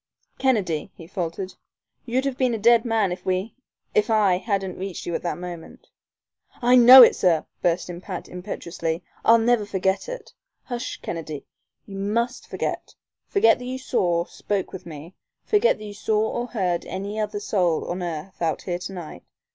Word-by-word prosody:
"Kennedy," 200 - +1
he 165 - -11
faltered, 185 +1 -4 0.5
"you'd 255 +3 0
have 275 -2 -1
been 250 -2 +1
a - - -2
dead 230 +2 +4
man 220 -5 +1
if 180 - -5
we 185 +4 -1 0.4
if 210 +3 +2
I 205 -5 +4
hadn't 195 -4 -2
reached 190 -1 -5
you 170 - -3
at - - -1
that 175 - -3
moment." 175 -2 -9 0.7
"I 245 +1 +4
know 250 +1 +11
it, - - +6
sir," 170 -4 +2 0.2
burst 175 0 +1
in 175 0 -7
Pat, 185 -1 -6
impetuously. 170 -2 -4 0.2
"I'll 230 - +7
never 230 -1 +2
forget 190 - -1
it - - -8
" - - -57
"Hush, 245 -1 -4
Kennedy, 155 -4 -5 0.4
you 195 -1 -8
must 235 +5 -1
forget - - -4 0.3
forget 245 - +4
that 250 - -7
you 255 +1 -4
saw 175 -10 0
spoke 200 0 -3
with 190 -1 -8
me 160 +2 -9 0.3
forget 440 +3 +3
that 215 - -9
you 205 - -7
saw 215 +1 0
or 240 +1 -3
heard 185 -8 -1
any 200 +3 -5
other 210 -1 -2
soul 180 -5 0
on 180 +1 -3
earth 175 +1 -6
out 165 -2 -1
here 175 -2 -3
to 185 +2 -6
night. 160 - -8
195 Hz, 180 wpm, -24 LUFS, 175-230 Hz, 0.7 s, know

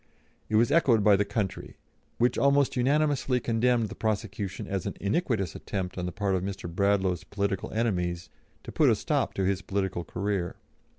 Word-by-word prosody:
It 110 - 0
was 115 +2 +4
echoed 125 -10 +4
by 105 -1 +6
the 100 - +2
country, 100 -1 -3 0.4
which 120 +1 +2
almost 140 0 +3
unanimously 140 0 +2
condemned 115 -1 +1
the - - -7
prosecution 105 -3 -3
as 95 -3 -3
an - - -4
iniquitous 105 - 0
attempt 90 -2 -4
on 90 -1 -3
the - - -3
part 100 +1 -1
of 95 - +1
Mr. 95 -1 -5
Bradlaugh's 95 0 +1
political 100 -1 -2
enemies 90 -6 -1 0.4
to - - -8
put - - +4
a - - +4
stop - - -1
to 95 - 0
his 95 0 0
political 95 -3 -2
career. 95 0 -2
100 Hz, 175 wpm, -28 LUFS, 95-115 Hz, 0.4 s, by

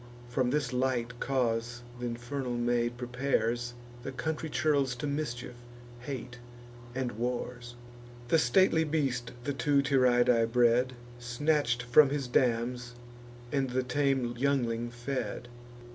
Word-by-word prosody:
From 125 +1 0
this 135 -2 0
light 125 -1 -1
cause 120 -2 -1 0.2
th' - - -7
infernal 120 +1 -3
maid 120 0 0
prepares 120 -1 -1 0.3
The 135 - -5
country 160 +3 -3
churls 140 -4 +1
to 125 - -5
mischief, 125 -4 -3 0.5
hate, 125 -2 -6 0.6
and 130 -2 -1
wars. 120 0 -3 0.5
The 165 - +5
stately 175 -1 +4
beast 135 -6 -1
the 145 - -1
two 140 +2 +2
Tyrrhidae 120 -4 +3
bred, 125 +1 +3 0.3
Snatch'd 125 0 0
from 130 +4 +6
his 140 -2 -2
dams, 120 0 0 0.6
and 135 -2 0
the 130 +1 0
tame 135 -2 +1
youngling 120 -3 0
fed. 120 0 -4
125 Hz, 120 wpm, -30 LUFS, 120-140 Hz, 0.6 s, from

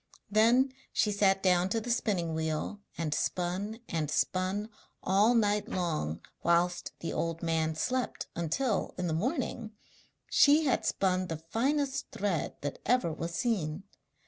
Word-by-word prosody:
Then 235 +5 +4 0.2
she 210 - +2
sat 195 -1 +2
down 180 -1 +3
to 225 - +1
the 240 +2 -3
spinning 190 -8 0
wheel 160 +6 -2 0.2
and 160 -3 -1
spun 185 +8 -2
and 155 -3 -2
spun 190 +7 0 0.3
all 205 +6 +4
night 210 -2 +2
long 155 - -2 0.2
whilst 175 +1 +1
the 165 - -3
old 165 0 -2
man 160 -1 0
slept, 250 +11 -1
until, 180 - -1
in 180 - -2
the 165 - 0
morning, 235 - -2 0.5
she 295 +2 +5
had 265 - +1
spun 185 -1 +1
the 165 - -3
finest 275 +3 0
thread 195 -5 -2
that 145 -1 -4
ever 245 -8 +2
was 165 +2 -4
seen. 190 -8 -1
190 Hz, 145 wpm, -30 LUFS, 165-225 Hz, 0.5 s, she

